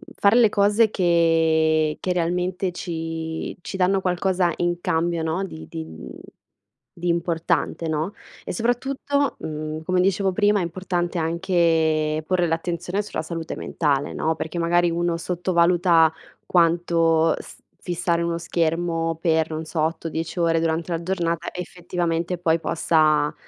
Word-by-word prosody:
fare 200 +2 +4
le 230 -3 +6
cose 205 +2 +3
che 160 -3 +2
che 185 - -1
realmente 180 +2 -1
ci 165 -2 -5
ci - - -7
danno 190 +1 +2
qualcosa 180 -1 +1
in 175 0 0
cambio, 165 0 0
no, 165 +4 -1
di 80 - -8
di 80 0 -6
mhmm 80 -5 -10 0.9
di 175 - -3
importante, 170 -1 0
no, 155 +5 -2 0.3
e - - -5
soprattutto, 270 +6 -1
mhmm 155 0 -5
come 185 0 +2
dicevo 190 0 +1
prima, 205 0 +3
è - - 0
importante 175 0 -2
anche 160 -2 +1
porre 180 -2 +2
l'attenzione 170 +4 -2
sulla 205 - -4
salute 165 0 -5
mentale, 145 -3 -1
no, 160 +1 0
perché 160 +2 -4
magari 175 +1 +2
uno 170 0 0
sottovaluta 170 -1 +3 0.3
quanto 165 -1 +3
st - - -12 0.2
fissare 170 -1 -1
uno 170 0 -1
schermo 165 -1 -1
per, 160 -1 +2
non 155 0 -4
so, 160 0 -5
8-10 165 +1 -3
ore 165 -1 +3
durante 165 +1 -1
la 165 0 -1
giornata 170 -2 -2
effettivamente 175 -1 -3
poi 165 -1 +1
possa, 155 -3 +2
170 Hz, 140 wpm, -23 LUFS, 160-180 Hz, 0.9 s, le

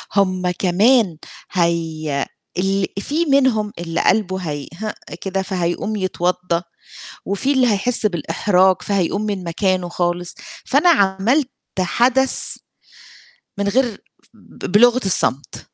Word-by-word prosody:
هم 185 -2 +1
كمان 195 +2 +2 0.3
هي 160 -5 -1 0.3
ال 195 +1 +1
فيه 305 +11 -1
منهم 250 -7 +2
اللي 170 -1 -2
قلبه 190 -4 +1
هيهِئ 170 +5 -5 0.3
كده، 195 0 -2
فهيقوم 185 +2 -2
يتوضّا 180 -2 -1 0.6
وفيه 200 +8 0
اللي 260 -2 +3
هيحس 220 +3 +1
بالإحراج 185 +1 +2
فهيقوم 200 0 0
من 200 -3 -3
مكانه 180 +1 0
خالص. 175 0 -2 0.3
فأنا 290 +6 +3
عملت 230 - +2 0.3
حدث 250 +8 +2 1.0
من 200 0 -1
غير 235 +1 0 0.3
ب - - -12
بلُغَة 245 +4 +5
الصمت. 140 -7 0
190 Hz, 105 wpm, -19 LUFS, 175-220 Hz, 1.0 s, بلُغَة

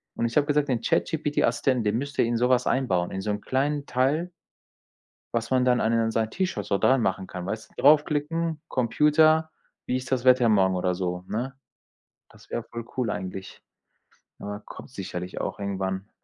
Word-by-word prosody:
Und - - -1
ich 115 - -2
habe 145 - +4
gesagt: 145 0 +2
„Den 120 -3 0
ChatGPT-Assistenten, 130 -4 +1
den 105 +2 +1
müsst 140 +2 -5
ihr - - +5
in 115 0 0
sowas 125 +1 +2
einbauen, 95 -10 +1
in 95 - -4
so 105 - -2
'm 105 0 -3
kleinen 140 +4 -1
Teil“ 145 +8 0 1.0
„was 115 -1 -1
man 130 -1 +3
dann 125 -1 +3
an 115 - +1
den 115 -1 +2
sein 110 0 0
T-Shirt 185 +6 -2
so - - +1
dran 130 +4 +4
machen 95 -3 -1
kann“, 90 -1 -7
weißt 110 0 -5
du, - - -9
draufklicken: 150 +2 +3
„Computer, 155 +5 +3 0.4
wie 125 - 0
ist 130 0 -5
das 130 -1 +1
Wetter 125 -2 +6
morgen?“ 95 -3 +3
oder 90 0 0
so, 90 0 -3
ne? 125 +7 -3 0.8
Das - - -19
wär 120 - -2
voll 115 0 -8
cool 120 -4 0
eigentlich. 95 -1 -6 0.8
Aber, 105 +1 -6
kommt - - -11
sicherlich 90 -5 -6
auch - - -4
irgendwann. 95 0 -3
120 Hz, 185 wpm, -26 LUFS, 105-140 Hz, 1.0 s, Wetter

